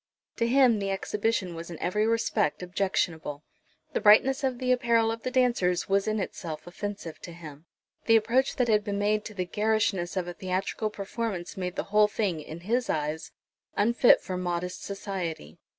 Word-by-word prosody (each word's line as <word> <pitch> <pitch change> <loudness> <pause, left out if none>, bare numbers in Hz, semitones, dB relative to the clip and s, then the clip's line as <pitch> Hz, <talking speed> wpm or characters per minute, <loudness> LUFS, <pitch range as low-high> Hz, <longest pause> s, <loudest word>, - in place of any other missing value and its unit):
To 230 - +1
him 250 -3 +4
the 195 -1 -2
exhibition 200 0 -1
was 165 +1 -7
in 170 - -7
every 210 +7 0
respect 225 -8 0
objectionable. 170 -5 -2 0.5
The - - 0
brightness 265 +6 +5
of 260 -2 0
the 255 0 0
apparel 235 -3 +3
of 225 0 -5
the 255 - -2
dancers 240 -9 +2
was 195 +1 +1
in 215 0 0
itself 165 -5 -5
offensive 175 -2 -6
to 175 - -9
him. 160 -2 -11 0.4
The 225 - +6
approach 235 +5 +2
that 250 - +1
had 210 -2 +3
been 205 -1 -2
made 210 +1 +1
to 215 - -8
the 185 -2 -2
garishness 210 -3 0
of 180 -1 -1
a 175 - -5
theatrical 190 +4 -2
performance 200 -3 -4
made 180 -1 -4
the - - -2
whole 210 0 +6
thing, 200 -6 -1
in 160 +3 -9
his 235 +6 0
eyes, 155 +1 -2 0.5
unfit 235 +4 +5
for 185 - -4
modest 180 0 -3
society. 180 - -5
200 Hz, 180 wpm, -28 LUFS, 175-225 Hz, 0.5 s, The